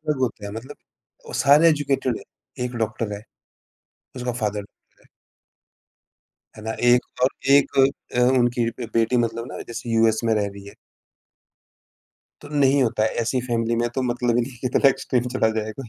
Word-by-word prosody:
अलग 150 -2 0
होते 110 -5 -2
हैं, 100 - -7
मतलब 120 +7 -8 0.5
वो - - -9
सारे 150 +4 +5
एजुकेटेड 140 -5 0
हैं, 125 - -10
1 125 0 -5
डॉक्टर 110 -1 -2
है, 100 0 -6 0.9
उसका 125 -1 -3
फादर 105 -1 -1
होता 100 - -19
है। - - -25 1.5
है 110 - -10
ना? 110 - -3
1 120 0 +5 0.2
और 130 - +6 0.2
1 140 0 +4 0.4
अ, - - +3 0.2
उनकी 120 -1 +1 0.2
बेटी 115 +2 +1
मतलब 115 0 -1
ना - - -7
जैसे 120 0 -6
यूएस 115 -1 +3
में 115 -1 +2
रह 105 -1 0
रही 100 0 -12
है। 100 - -11 1.7
तो 145 - -10
नहीं 140 -2 +3
होता 115 -3 0
है, 110 - +3
ऐसी 125 +3 0
फैमिली 115 -1 0
में 120 +1 +1
तो 130 - -1
मतलब 120 -1 0
ही 120 - +3
नहीं 130 +3 -6
है 120 - -15
कि 125 - -3
इतना 130 +2 +4
एक्सट्रीम 125 -2 0
चला 110 - +3
जाए 110 0 -5
कोई। 130 - -8
120 Hz, 185 wpm, -23 LUFS, 110-130 Hz, 1.7 s, और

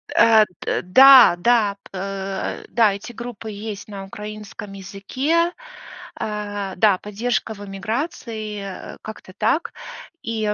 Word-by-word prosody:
Э, 225 -2 +6 0.2
д - - -1
да, 260 +2 +8
да. 215 -1 +2 0.2
Э, 195 0 -4
да, 220 -4 +3
эти 200 +4 -8
группы 235 -2 -7
есть 205 0 -7
на 195 -2 -7
украинском 210 0 -8
языке. 260 - -1 0.7
Э, 205 -2 -4
да, 200 0 +4
"Поддержка 220 +2 -2
в 205 -1 -10
эмиграции", 215 - -4 0.3
э, - - -20
как-то 215 -3 -10
так. 225 +10 0 0.5
И 220 -2 -1
210 Hz, 120 wpm, -21 LUFS, 195-230 Hz, 0.7 s, да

